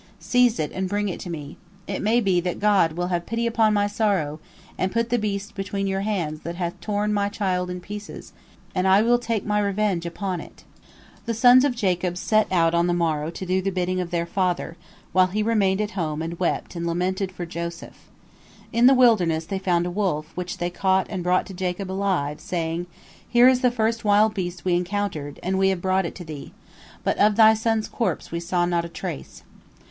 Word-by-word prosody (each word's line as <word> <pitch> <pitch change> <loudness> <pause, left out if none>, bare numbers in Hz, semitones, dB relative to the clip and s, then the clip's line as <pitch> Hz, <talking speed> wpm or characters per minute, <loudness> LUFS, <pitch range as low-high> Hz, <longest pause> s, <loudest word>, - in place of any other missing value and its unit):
Seize 245 -2 +2
it 150 - -1
and 190 0 -3
bring 205 +1 -1
it 180 - -5
to 180 - -7
me. 150 -3 -7 0.3
It 195 - -4
may 230 +3 +2
be 190 -4 +2
that 180 0 -3
God 200 -6 +3
will 175 +2 -2
have 175 -1 -2
pity 230 +1 -1
upon 225 -2 +3
my 205 -1 +2
sorrow, 200 -8 0 0.4
and 185 - -1
put 230 +1 -1
the 245 - +2
beast 205 -1 -3
between 195 0 -3
your 195 0 -1
hands 175 -7 -2
that 170 +2 -5
hath 175 -1 -4
torn 210 0 -1
my 200 -1 +1
child 185 -3 -1
in 180 0 -4
pieces, 205 +2 -9 0.4
and 185 0 +1
I 195 +3 +5
will 240 +1 +3
take 230 -4 -2
my 210 0 +1
revenge 200 -4 0
upon 180 0 -3
it." - - -14 0.6
The 230 - -1
sons 245 +3 +7
of 280 -4 +1
Jacob 180 -5 0
set 215 +4 +1
out 165 -2 +3
on 170 +1 +2
the 175 - +1
morrow 160 -3 0
to 180 +3 -6
do 185 +1 +1
the 195 - -1
bidding 185 0 -1
of 175 - -4
their 170 -1 -1
father, 175 -2 -1 0.4
while 185 0 +4
he 210 +3 -1
remained 210 -3 +2
at 210 0 -2
home 160 -5 -2
and 165 +1 -5
wept 180 0 -1
and 170 0 -3
lamented 185 +3 -1
for 180 -2 -6
Joseph. 170 0 -7 0.6
In 235 +2 +5
the 270 - +7
wilderness 180 -11 +3
they 190 +3 -3
found 175 -2 +1
a 180 - -3
wolf, 175 -6 -1
which 180 0 -5
they 175 0 -2
caught 190 +1 +1
and 190 -3 -3
brought 180 +1 +2
to 195 - -9
Jacob 185 +1 -3
alive, 185 -7 -1
saying: 170 0 -3 0.4
"Here 245 +1 +6
is 260 -1 +5
the 250 - +4
first 230 -1 -1
wild 210 +1 +4
beast 180 -3 -4
we 180 - +2
encountered, 175 -5 -2
and 190 +1 0
we 190 0 +4
have 190 -2 0
brought 185 0 +1
it - - -8
to 180 - -8
thee. 155 -3 -8 0.5
But - - 0
of 210 0 +4
thy 220 0 +7
son's 220 0 0
corpse 230 - -2
we 170 - -2
saw 175 0 0
not 175 -1 0
a 170 - -6
trace." 65 - -7
190 Hz, 215 wpm, -24 LUFS, 175-210 Hz, 0.6 s, sons